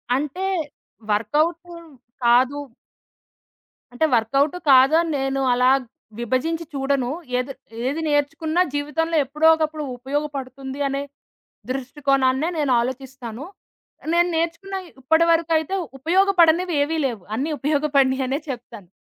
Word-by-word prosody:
అంటే, 295 +7 -3 0.7
వర్కవుటు 310 +11 0 0.5
కాదు 255 +4 +4 1.3
అంటే, 280 +6 +1
వర్కవుటు 275 +8 +1
కాదు 265 +3 +6
అని 335 -2 -2
నేను 270 0 -1
అలా 250 +1 +3 0.5
విభజించి 265 +8 -1
చూడను. 270 -2 0 0.3
ఎది 260 +2 -4 0.3
ఏది 295 +4 -2
నేర్చుకున్నా 310 +3 +1
జీవితంలో 300 +3 -1
ఎప్పుడో 300 +4 +1
ఒకప్పుడు 310 -1 -2
ఉపయోగపడుతుంది 270 0 -5
అనే 275 +1 -2 0.7
దృష్టికోణాన్నే 270 +2 0
నేను 290 -3 +1
ఆలోచిస్తాను. 260 0 -6 0.7
నేను 345 +1 +3
నేర్చుకున్న 340 +4 -2 0.3
ఇప్పటివరకు 330 +4 +3
అయితే 315 +5 -2 0.2
ఉపయోగపడనివేవీ 335 -2 +3
లేవు. 225 -7 -6
అన్నీ 290 +6 -2
ఉపయోగపడినయి 275 -2 +2
అనే 270 +2 0
చెప్తాను. 215 -7 -8
285 Hz, 100 wpm, -22 LUFS, 260-320 Hz, 1.3 s, కాదు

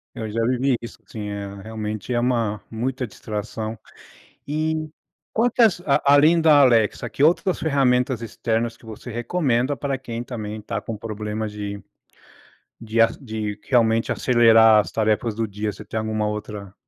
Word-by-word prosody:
Eu 110 -1 -5
já 115 +2 -2
vivi 130 +1 +1
isso, 115 - -9
sim. 105 -2 -6
É 100 -1 -5
realmente 110 +1 -5
é 120 - +1
uma 115 -4 0
muita 125 +3 -2
distração. 110 +1 -5 0.7
E 155 +1 -1 0.5
quantas 225 -5 +3
a 140 - +3
além 155 +4 +6
da 155 -3 +6
Alexa, 115 -6 +3
que 140 - -1
outras 175 +4 +3
ferramentas 130 -5 +1
externas 115 0 -2
que - - -19
você 110 +2 -9
recomenda 125 +1 0
para 140 -1 -2
quem 120 -3 -6
também 110 -4 -6
está 105 - -4
com 115 - -6
problema 110 0 -4
de 100 -1 -6 1.0
de 115 +1 +1
as 115 0 +3
de 110 -4 -5
realmente 115 -3 +3
acelerar 115 -3 +6
as 105 - -1
tarefas 110 0 0
do 115 +1 -1
dia. 105 +1 -3
Você - - -11
tem 110 - -4
alguma 110 -1 -1
outra 105 -2 -6
115 Hz, 155 wpm, -23 LUFS, 110-130 Hz, 1.0 s, além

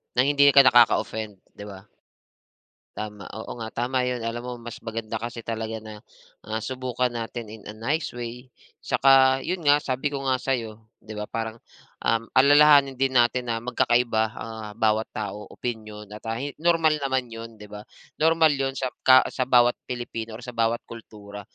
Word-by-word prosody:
Nang 130 +3 +3
hindi 140 0 +4
ka 140 - +9
nakaka-offend, 110 -5 +3 0.2
'di 105 - -8
ba? 100 -2 -10 1.1
Tama, 105 -1 -6
oo 110 +2 -7
nga, 110 -1 -7
tama 125 +1 -1
yun. 125 -1 -2
Alam 115 +1 -3
mo 125 - -4 0.2
mas - - -9
maganda 115 0 -4
kasi 115 +1 -6
talaga 110 -1 -4
na, 110 -1 -10 0.5
ah, 110 +1 -3
subukan 125 0 -2
natin 115 -1 -6
in 110 -1 -12
a 105 - -8
nice 145 +9 -2
way, 120 +1 -8 0.3
tsaka 135 -1 +5
yun 180 0 -4
nga 145 +1 +5
sabi 135 +2 -2
ko 140 - -3
nga 130 -1 +1
sa'yo, 120 -5 -3 0.2
'di 110 -1 -9
ba, 105 - -3
parang, 115 +1 -5 0.5
um, 115 0 0
alalahanin 145 0 +6
din 130 0 0
natin 120 +1 +2
na 115 - 0
magkakaiba, 120 -1 +1
ah, 110 -2 -7
bawat 110 0 +1
tao, 105 0 -6
opinyon, 110 -3 -6
at, 105 - -9
ah, 115 - -2 0.2
normal 165 -2 +3
naman 130 -3 -2
yun, 115 0 -9
'di 105 - -11
ba, 105 0 -10 0.4
normal 160 -1 +4
yun 135 -1 -2
sa 130 -2 -3
ka 130 0 +6
sa - - -3
bawat 120 -1 +5 0.2
Pilipino 115 -2 -5
or 120 - -11
sa 125 - -7
bawat 115 +1 0
kultura. 105 -3 -11
120 Hz, 175 wpm, -25 LUFS, 110-130 Hz, 1.1 s, ka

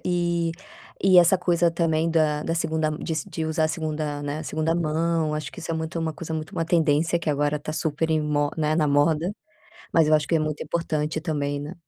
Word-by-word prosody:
eh 175 -1 0 0.7
essa 175 +2 +6
coisa 175 -1 +2
também 165 -1 +1
da 155 -2 +1
da 165 - -1
segunda 160 -1 0
de 155 +2 -4 0.2
de 160 - -3
usar 160 0 0
a - - +1
segunda, 155 -2 -3
né, 145 +2 -3
segunda 155 +1 -1
mão 165 -1 0
acho 150 0 -4
que - - -13
isso 165 - -6
é - - -1
muito 160 +1 -3
uma 160 -1 -1
coisa 160 +1 -7
muito 155 -1 -4
uma 165 - -1
tendência 165 0 +2
que 170 - -4
agora 145 0 +1
está 150 +1 -5
super 160 0 -1
em 155 - +2
mo 145 -1 0
né 155 -1 +1
na 155 -2 +2
moda 155 +6 +2 0.6
mas 165 -2 +4
eu 155 - +5
acho 150 -1 +2
que 165 - +2
é - - +2
muito 155 -1 -2
importante 155 -1 -2
também, 145 -3 -2
né. 150 +5 -7
160 Hz, 215 wpm, -24 LUFS, 150-165 Hz, 0.7 s, essa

